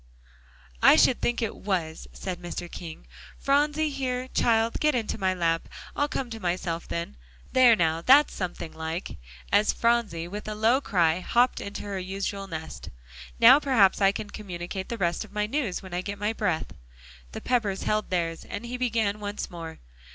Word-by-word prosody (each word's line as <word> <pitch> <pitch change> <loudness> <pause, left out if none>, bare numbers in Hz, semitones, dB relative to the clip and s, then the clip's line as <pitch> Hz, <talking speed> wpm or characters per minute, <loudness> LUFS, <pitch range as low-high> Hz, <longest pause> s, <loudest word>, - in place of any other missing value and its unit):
"I - - +8
should 255 - +4
think 240 0 0
it 225 - -3
was," 175 -5 -3
said 180 -2 -6
Mr. 175 0 -6
King. 160 - -9 0.3
"Phronsie, 295 +2 +1
here, 255 -2 -2
child, 230 -2 +2
get 300 -2 +2
into 225 -2 -2
my 190 -1 +1
lap. 165 -2 0 0.3
I'll 290 - +1
come 260 -4 -4
to 225 - -6
myself 175 -3 -2
then. 170 +4 -4 0.3
There, 255 -3 +6
now, 165 -4 +1
that's 280 - +6
something 175 -3 -5
like," 160 - -5 0.3
as 205 +1 +4
Phronsie, 230 -8 0
with 205 +4 -7
a 215 - -3
low 230 +5 +3
cry, 170 - +2
hopped 240 +7 +2
into 200 - -6
her 200 -2 -4
usual 195 +1 -4
nest. 160 - -7 0.5
"Now 250 +5 +9
perhaps 230 -10 +3
I 195 0 +5
can 205 +1 -6
communicate 190 -1 -6
the 235 - -3
rest 175 -1 0
of 215 - -15
my 210 0 0
news, 225 -6 -2
when 185 -2 -10
I 175 - -1
get 200 +2 -5
my 210 +2 -1
breath." 180 -8 -1 0.6
The - - -5
Peppers 215 -6 0
held 215 0 0
theirs, 165 -2 -1
and 230 - -6
he 245 +1 -4
began 225 -4 0
once 205 0 -5
more. 165 -2 -8
205 Hz, 180 wpm, -26 LUFS, 175-235 Hz, 0.6 s, Now